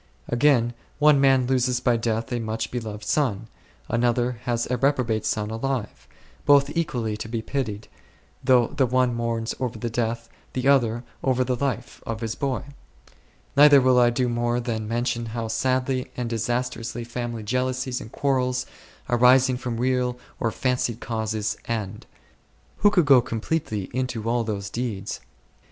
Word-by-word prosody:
Again, 120 -2 +3 0.2
one 150 -2 +5
man 135 -2 +4
loses 125 -1 +1
by 125 -1 +2
death 115 0 -1
a 120 - 0
much 110 0 -3
loved? 110 -3 -5
son; 115 -5 0 0.4
another 120 +1 +1
has 120 -1 0
a 125 - +1
reprobate 125 -5 +1
son 105 0 -1
alive; 120 0 -3 0.4
both 145 +1 +4
equally 120 -10 -1
to 110 - -6
be 115 -1 -3
pitied, 110 -7 -3 0.6
though 125 -2 +5
the 135 -3 +1
one 125 0 +2
mourns 115 -1 -2
over 125 -3 -2
the 115 +1 -4
death, 115 0 -2 0.3
the 130 +1 -1
other 120 -4 +3 0.2
over 130 -1 +2
the 125 0 -1
life, 125 -2 -3
of 115 0 -5
his 115 -1 -2
boy. 135 -1 -2 0.9
Neither 145 0 +8
will 130 -1 +4
I 120 -1 +5
do 125 +1 0
more 120 0 0
than 115 -3 -3
mention 120 0 -1
how 115 -1 -2
sadly 130 +2 0
and 120 -2 -3
disas 120 +3 -1
trously 115 0 -6
family 120 -1 -4
jealousies 130 +2 -1
and 110 - -10
quarrels, 125 -2 0 0.4
arising 125 +1 +5
from 125 -2 -4
real 125 0 0 0.2
or 115 - +1
fancied 125 -1 -1
causes, 110 -2 -2
end. 105 -3 -4 0.7
Who 205 - +5
could 180 -5 +3
go 135 -3 +7
completely 115 -2 -2
into 125 -3 -2
all 120 0 +1
those 100 -3 -4
details 110 -5 -3
120 Hz, 155 wpm, -24 LUFS, 115-130 Hz, 0.9 s, Neither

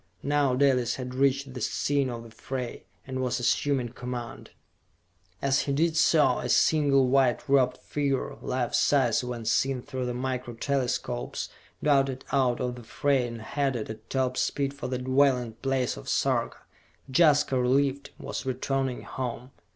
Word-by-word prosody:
Now 140 -2 +2
Dalis 130 -3 +2
had 125 -1 -6
reached 135 0 +1
the 125 - -6
scene 140 +3 0
of 120 -1 -6
the 115 - -13
fray, 125 0 -6 0.2
and 130 0 -4
was 125 -1 -1
assuming 125 +1 +1
command. 125 0 -7 0.9
As 140 0 +3
he - - +1
did 160 +3 +1
so 155 -5 +4
a - - -4
single 140 -4 +4
white 130 -2 +2
robed 130 -2 +3
figure, 140 -2 -2
life 125 -2 -2
size 130 -5 +3
when 120 -2 -5
seen 130 +2 +1
through 130 -3 -4
the 125 - -3
Micro 125 -1 -3
Telescopes, 125 -2 -2 0.3
darted 135 -3 +2
out 130 -3 +2
of 125 0 -2
the 120 - -10
fray 135 +2 +1
and 115 -1 -7
headed 135 -5 -2
at 110 0 -12
top 130 -1 0
speed 140 -1 0
for 140 -3 -6
the 125 0 -2
dwelling 130 -2 +2
place 135 -2 0
of - - -8
Sarka. - - 0 0.5
Jaska, 145 -3 +4
relieved, 135 +2 +1
was - - -5
returning 130 0 -2
home! 125 0 -5
130 Hz, 155 wpm, -27 LUFS, 125-140 Hz, 0.9 s, so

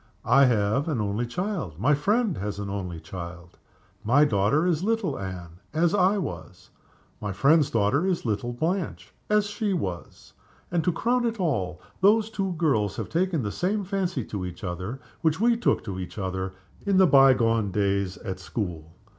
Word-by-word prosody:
I 140 0 +6
have 115 +3 +1
an 150 -7 -1
only 105 +3 -1
child. 180 - -3
My 135 +8 +3
friend 205 - +1
has 100 0 -3
an 100 -1 -4
only 90 -4 -4
child. 85 +1 -9 0.4
My 140 +7 +5
daughter 110 - +2
is 175 -2 +1
little 210 -9 0
Anne 90 -3 -7 0.2
as 165 +1 +3
I 195 +1 +3
was. 180 -7 -6 0.5
My 105 - -3
friend's 140 - +4
daughter 115 - +2
is 180 -7 -1
little 115 +2 -1
Blanche 165 +9 -3 0.2
as 210 -1 +3
she 205 0 -2
was. 95 - -5 0.4
And, 170 -2 +1
to 180 - +3
crown 240 +8 +1
it 225 -1 -3
all, 95 - -1 0.2
those 215 +3 +4
two 195 -3 -2
girls 135 - +1
have - - -5
taken 170 -4 0
the 105 - -2
same 200 - -1
fancy 185 - -2
to 100 -3 -5
each 90 -1 -7
other 90 +7 -4 0.2
which 160 0 +1
we 235 +2 +4
took 235 - +1
to 95 -4 -5
each 90 +2 -7
other 95 -1 -3 0.3
in 200 -2 +2
the 190 - +7
by 135 -5 +7
gone 115 -3 +1
days 100 -1 0
at 95 -5 -6
school. 85 -5 -5
130 Hz, 180 wpm, -26 LUFS, -, 0.5 s, the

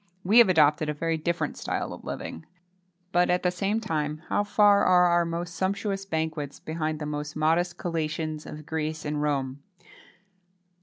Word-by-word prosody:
We 210 +6 +6
have 230 -5 +7
adopted 155 -2 +4
a 150 - -2
very 165 +2 -1
different 170 +2 -2
style - - -3
of - - -11
living. 80 - -6 0.6
But, 175 0 +3
at 180 0 +1
the 180 - +2
same 200 +4 -1
time, 155 -7 -3
how 205 - +2
far 205 0 +4
are 180 -1 +5
our 175 -1 +3
most 170 +1 -4
sumptuous 195 +2 -2
banquets 160 -4 -3
behind 155 -1 -3
the 150 - -5
most 150 0 -4
modest 170 +3 +1
collations 155 -2 -3
of 150 0 -9
Greece 155 -1 -3
and 150 0 -2
Rome! 140 -2 -1
160 Hz, 165 wpm, -27 LUFS, 150-180 Hz, 0.6 s, have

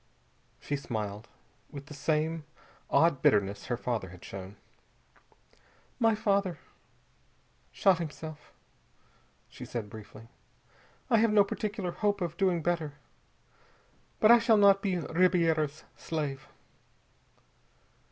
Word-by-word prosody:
She 145 - -3
smiled, 110 -5 -5 0.4
with 140 -1 -9
the 150 - -11
same 155 +2 -1 0.5
odd 165 -5 +3
bitterness 100 -3 +2
her 120 - -1
father 115 -6 -3
had 90 0 -13
shown. 95 +1 -8 1.4
"My 225 -2 +4
father 200 -5 0 1.1
shot 190 -3 +3
himself," 155 -1 -7 1.0
she - - -11
said 110 -4 -5
briefly. 110 +1 -11 0.8
"I 230 - +6
have 225 0 +3
no 210 -1 +6
particular 205 -2 -3
hope 205 +2 0
of 170 -3 -3
doing 180 -3 +1
better. 165 -4 -1 1.3
But 215 - +6
I 240 - +8
shall 230 -1 +4
not 200 -1 +6
be 190 -3 0
Ribiera's 165 -3 +1
slave." 145 -4 -4
160 Hz, 110 wpm, -29 LUFS, 130-195 Hz, 1.4 s, I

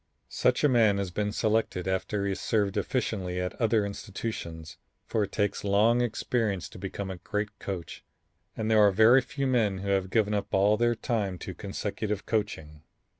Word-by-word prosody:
Such 125 +3 +1
a - - +7
man 115 -6 +4
has 100 -2 -2
been 105 +3 -1
selected 110 -4 0
after 95 +2 -1
he 100 - 0
has 95 - -3
served 100 -3 0
efficiently 95 -8 -1
at 90 0 -2
other 110 -2 +3
institutions, 100 -6 -6 0.3
for 110 - -1
it - - -15
takes 100 -1 -1
long 105 +4 +3
experience 110 -4 -1
to - - -12
become 100 -1 -5
a 95 - -6
great 105 +4 -4
coach 95 -4 -6 0.5
and 110 0 -1
there 110 - +5
are 105 - +7
very 110 +6 +6
few 140 +2 -4
men 115 -7 +2
who 100 +1 -4
have 95 -1 +1
given 105 0 +2
up 100 -1 -1
all 100 +2 +4
their 120 +1 +2
time 105 -6 -2
to 95 - -5
consecutive 105 +1 -4
coaching. 80 -9 -3
105 Hz, 180 wpm, -28 LUFS, 95-110 Hz, 0.5 s, a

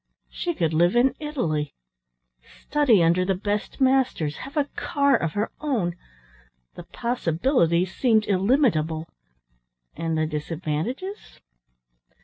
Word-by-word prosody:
She 345 -2 -3
could 165 - 0
live 175 +6 +3
in 250 +2 +4
Italy, 170 - -2 0.7
study 260 - +2
under 170 +2 +3
the 190 +1 0
best 205 +6 -3
masters, 260 - +2
have 275 +4 -8
a 290 - +3
car 280 -1 +2
of 165 -8 -1
her 210 +2 -1
own 225 - -1 0.8
the - - -10
possibilities 180 - 0
seemed 220 -4 +3
illimitable 185 - +1 0.9
and 165 0 -2
the 155 - +1
disadvantages? 165 - -4
195 Hz, 115 wpm, -24 LUFS, 165-265 Hz, 0.9 s, in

